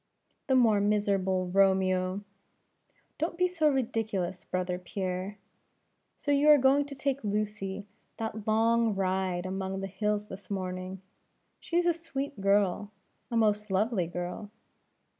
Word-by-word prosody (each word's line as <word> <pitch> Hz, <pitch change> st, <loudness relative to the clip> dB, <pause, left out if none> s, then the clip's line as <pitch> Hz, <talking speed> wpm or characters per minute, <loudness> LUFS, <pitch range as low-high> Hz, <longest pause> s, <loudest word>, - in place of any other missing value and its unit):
"The 265 Hz, -, +3 dB
more 225 Hz, -5 st, +5 dB
miserable 200 Hz, -3 st, +1 dB
Romeo!" 190 Hz, 0 st, +2 dB, 1.0 s
"Don't 335 Hz, +2 st, -2 dB
be 365 Hz, 0 st, +3 dB
so 330 Hz, -4 st, +2 dB
ridiculous, 220 Hz, -9 st, -1 dB
brother 180 Hz, 0 st, -2 dB
Pierre; 185 Hz, +1 st, -4 dB, 0.8 s
so 290 Hz, -, -2 dB
you 285 Hz, +1 st, +4 dB
are 300 Hz, -, +9 dB
going 275 Hz, +2 st, +4 dB
to 280 Hz, 0 st, -8 dB
take 275 Hz, -1 st, -2 dB
Lucy 205 Hz, -1 st, -2 dB, 0.3 s
that 220 Hz, -1 st, -5 dB
long 225 Hz, 0 st, +3 dB
ride 185 Hz, -2 st, 0 dB
among 190 Hz, 0 st, -3 dB
the 195 Hz, -, -3 dB
hills 210 Hz, +2 st, -1 dB
this 195 Hz, -1 st, -11 dB
morning? 185 Hz, -1 st, -4 dB, 0.6 s
She 340 Hz, -, -2 dB
is 350 Hz, -, +3 dB
a 345 Hz, -, +4 dB
sweet 285 Hz, -7 st, -5 dB
girl; 200 Hz, 0 st, +2 dB, 0.4 s
a 235 Hz, -, -1 dB
most 210 Hz, -1 st, +2 dB
lovely 195 Hz, -2 st, +1 dB
girl." 180 Hz, +4 st, -5 dB
205 Hz, 135 wpm, -29 LUFS, 190-235 Hz, 1.0 s, are